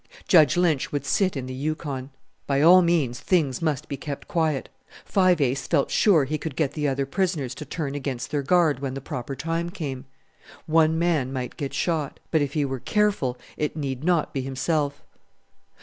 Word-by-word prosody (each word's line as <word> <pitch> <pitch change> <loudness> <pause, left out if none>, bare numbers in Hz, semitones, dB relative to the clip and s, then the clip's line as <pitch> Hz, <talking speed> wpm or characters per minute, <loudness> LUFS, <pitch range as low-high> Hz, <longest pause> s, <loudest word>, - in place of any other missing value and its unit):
Judge 155 -4 +5
Lynch 165 -6 +1
would 145 -1 -2
sit 185 +4 +1
in 130 - -4
the 130 - -6
Yukon. 140 -1 -4 0.4
By 140 -1 +1
all 180 +3 +8
means 160 -8 +1
things 155 -8 +1
must 155 -3 -1
be 140 - -4
kept 140 0 -6
quiet. 160 -5 0 0.4
Five 185 -3 +3
Ace 135 -1 0
felt 145 -5 +1
sure 180 -9 +4
he 155 +3 -2
could 155 -2 -5
get 145 -3 0
the 150 0 -1
other 135 0 0
prisoners 155 -4 -1
to 150 - -8
turn 145 -5 -4
against 135 -3 -4
their 145 -2 0
guard 155 -1 +3
when 135 -1 -4
the - - -3
proper 130 0 -5
time 165 +3 -2
came. 140 -6 -5 0.6
One 160 0 +3
man 160 -6 +1
might 130 -2 -4
get 140 -2 -4
shot; 160 -5 -1
but 160 - +3
if 140 -1 -1
he 150 -2 +1
were 135 -1 -3
careful 195 - 0 0.2
it 150 +1 -2
need 135 -2 -3
not 175 -2 +1
be 135 - -1
himself. 140 +2 -1
145 Hz, 190 wpm, -25 LUFS, 135-165 Hz, 0.6 s, all